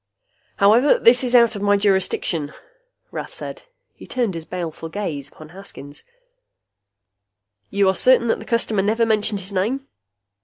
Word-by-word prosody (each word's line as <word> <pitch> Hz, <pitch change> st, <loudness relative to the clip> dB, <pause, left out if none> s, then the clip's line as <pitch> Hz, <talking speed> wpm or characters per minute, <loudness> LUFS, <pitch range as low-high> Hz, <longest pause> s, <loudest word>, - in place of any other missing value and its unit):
"However, 225 Hz, +8 st, +4 dB
that 245 Hz, +2 st, +4 dB
is 250 Hz, 0 st, 0 dB
out 235 Hz, -2 st, +5 dB
of 200 Hz, -, -6 dB
my 205 Hz, 0 st, +3 dB
jurisdiction," 190 Hz, -6 st, 0 dB, 0.6 s
Rath -, -, -7 dB
said. -, -, -7 dB, 0.3 s
He -, -, -14 dB
turned 240 Hz, -6 st, -1 dB
his 165 Hz, -1 st, -7 dB
baleful 165 Hz, -2 st, -6 dB
gaze 155 Hz, -7 st, -5 dB
full -, -, -27 dB
upon 155 Hz, -1 st, -12 dB
Haskins. 155 Hz, -6 st, -10 dB, 1.7 s
"You 200 Hz, 0 st, +1 dB
are 190 Hz, -, +3 dB
certain 250 Hz, +4 st, +4 dB
that -, -, +1 dB
the -, -, -10 dB
customer 230 Hz, -3 st, 0 dB
never 220 Hz, +4 st, +1 dB
mentioned 210 Hz, -2 st, +1 dB
his 195 Hz, +2 st, -7 dB
name?" 235 Hz, +9 st, -1 dB
200 Hz, 155 wpm, -21 LUFS, 180-230 Hz, 1.7 s, out